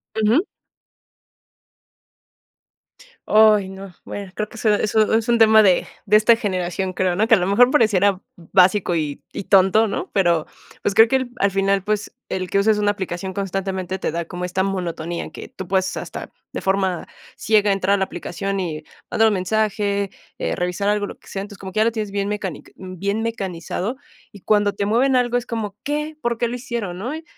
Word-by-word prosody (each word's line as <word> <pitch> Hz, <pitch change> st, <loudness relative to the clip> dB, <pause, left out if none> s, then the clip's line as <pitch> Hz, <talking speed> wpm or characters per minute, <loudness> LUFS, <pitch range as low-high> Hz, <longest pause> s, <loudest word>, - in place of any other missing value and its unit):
Ujú. 220 Hz, -, +3 dB, 2.8 s
Oy 215 Hz, -2 st, +5 dB
no, 190 Hz, -1 st, -10 dB
bueno, 200 Hz, -2 st, -7 dB
creo 215 Hz, 0 st, -3 dB
que 235 Hz, -, -12 dB
so 215 Hz, -1 st, +2 dB
eso 215 Hz, +1 st, +2 dB
es 225 Hz, +1 st, +1 dB
un 235 Hz, -, +4 dB
tema 220 Hz, -1 st, +7 dB
de 185 Hz, -4 st, +4 dB, 0.2 s
de 210 Hz, +2 st, +6 dB
esta 220 Hz, +2 st, +5 dB
generación, 185 Hz, -3 st, -2 dB
creo, 185 Hz, -1 st, 0 dB
¿no?, 215 Hz, +4 st, +1 dB
que 225 Hz, -, +7 dB
a -, -, +1 dB
lo 180 Hz, -, 0 dB
mejor 225 Hz, +6 st, +5 dB
pareciera 205 Hz, -7 st, +3 dB, 0.2 s
básico 180 Hz, +1 st, +2 dB
y 150 Hz, -3 st, -3 dB
y -, -, -5 dB
tonto, 195 Hz, +4 st, +4 dB
¿no?, 200 Hz, -, -4 dB
pero, 170 Hz, -5 st, +2 dB, 0.3 s
pues, 200 Hz, -, -1 dB
creo 225 Hz, +2 st, +8 dB
que 265 Hz, -, +1 dB
el 260 Hz, -2 st, -4 dB
al 200 Hz, 0 st, +2 dB
final, 195 Hz, 0 st, +1 dB
pues, 210 Hz, 0 st, -2 dB, 0.2 s
el 185 Hz, -1 st, -3 dB
que -, -, +1 dB
uses 210 Hz, +1 st, +3 dB
una 205 Hz, 0 st, +2 dB
aplicación 190 Hz, -1 st, -5 dB
constantemente 190 Hz, -1 st, -3 dB
te -, -, -2 dB
da 170 Hz, 0 st, -3 dB
como 180 Hz, +1 st, -7 dB
esta 180 Hz, +1 st, -1 dB
monotonía, 175 Hz, -3 st, -3 dB
que -, -, -10 dB
tú 190 Hz, -, -8 dB
puedes 190 Hz, 0 st, 0 dB
hasta -, -, -7 dB, 0.2 s
de -, -, -5 dB
forma 190 Hz, -2 st, 0 dB, 0.3 s
ciega 210 Hz, -1 st, +3 dB
entrar 195 Hz, 0 st, +1 dB
a -, -, +3 dB
la 190 Hz, -, +1 dB
aplicación 195 Hz, +2 st, -4 dB
y 160 Hz, -4 st, -4 dB, 0.3 s
mandar 225 Hz, 0 st, +4 dB
un 215 Hz, -, +2 dB
mensaje, 200 Hz, 0 st, 0 dB, 0.3 s
eh, -, -, -1 dB
revisar 180 Hz, +3 st, -1 dB
algo, 210 Hz, 0 st, +1 dB
lo -, -, -9 dB
que -, -, -22 dB
sea, 195 Hz, -, -4 dB
entonces, 205 Hz, 0 st, -11 dB
como 190 Hz, -1 st, -7 dB
que 215 Hz, -, 0 dB
ya -, -, +5 dB
lo 230 Hz, -, +2 dB
tienes 215 Hz, -2 st, -3 dB
bien 200 Hz, 0 st, -1 dB
mecanic 205 Hz, -6 st, -5 dB
bien 190 Hz, +3 st, -3 dB
mecanizado, 200 Hz, 0 st, -3 dB, 0.3 s
y 205 Hz, -, -13 dB
cuando 205 Hz, 0 st, +2 dB
te 200 Hz, 0 st, -2 dB
mueven 255 Hz, +5 st, +3 dB
algo 245 Hz, -1 st, +2 dB
es 245 Hz, -, -3 dB
como, 215 Hz, -4 st, -4 dB
¿qué?, 300 Hz, +1 st, -3 dB
¿por 235 Hz, -1 st, -1 dB
qué 240 Hz, -, +1 dB
lo 240 Hz, -, -4 dB
hicieron?, 235 Hz, -7 st, -4 dB
¿no?, 245 Hz, +10 st, -4 dB
y 320 Hz, -, -8 dB
200 Hz, 200 wpm, -21 LUFS, 185-220 Hz, 2.8 s, creo